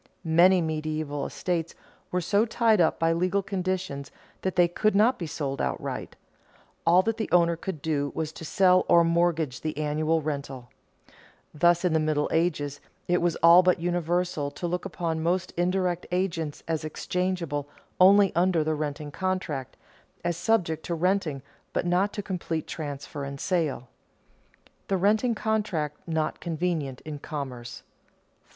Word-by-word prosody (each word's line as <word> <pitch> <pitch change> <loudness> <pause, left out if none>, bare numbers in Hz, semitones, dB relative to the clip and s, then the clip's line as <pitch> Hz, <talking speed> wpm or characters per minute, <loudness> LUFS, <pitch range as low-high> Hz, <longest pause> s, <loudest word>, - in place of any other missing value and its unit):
Many 175 +3 +5
medieval 155 -2 -2
estates 170 -3 -3 0.3
were 180 - -1
so 200 +5 +2
tied 225 -3 +3
up 160 - +2
by 165 0 +2
legal 185 +4 +1
conditions 185 -7 -3 0.3
that 190 - -2
they 175 -1 +5
could 215 +4 +1
not 230 +5 +4
be 170 - -4
sold 140 -3 -3
outright; 65 - -3 0.7
all 180 +2 +6
that 225 +1 -1
the 220 - -3
owner 170 -1 +4
could 165 -3 -6
do 145 -3 0
was 155 -1 -2
to - - -9
sell 185 +3 +4
or 170 - +7
mortgage 165 -5 +1
the 155 -2 -3
annual 155 +2 +1
rental. 140 -5 -5 0.8
Thus, 175 +3 +3
in 175 - +2
the 160 - +3
Middle 155 -1 +1
Ages, 150 -4 0 0.3
it 175 0 +2
was 170 -1 +1
all 170 +2 +9
but 180 -1 +2
universal 175 -3 -1
to 145 +5 -7
look 180 +2 -2
upon 165 -3 -2
most 180 +2 0
indirect 180 0 0
agents 170 -5 -2
as 160 -1 -1
exchangeable 165 -2 -2 0.3
only 195 +1 +6
under 175 -2 +3
the 155 +1 0
renting 150 -1 -4
contract, 185 -8 -3 0.5
as 175 -1 0
subject 175 -4 +1
to 170 - -1
renting 165 -5 0 0.3
but - - 0
not 180 +4 +2
to 205 - -4
complete 170 -5 -3
transfer 145 -2 -6
and 140 0 -6
sale. 165 -9 0
[Sidenote: 125 - -31
The 195 - +1
renting 215 +5 +2
contract 210 -10 -1
not 160 -2 -1
convenient 160 -6 -2
in 150 -2 -7
commerce] 125 -5 -6
4. - - -39
170 Hz, 155 wpm, -27 LUFS, 155-185 Hz, 0.8 s, all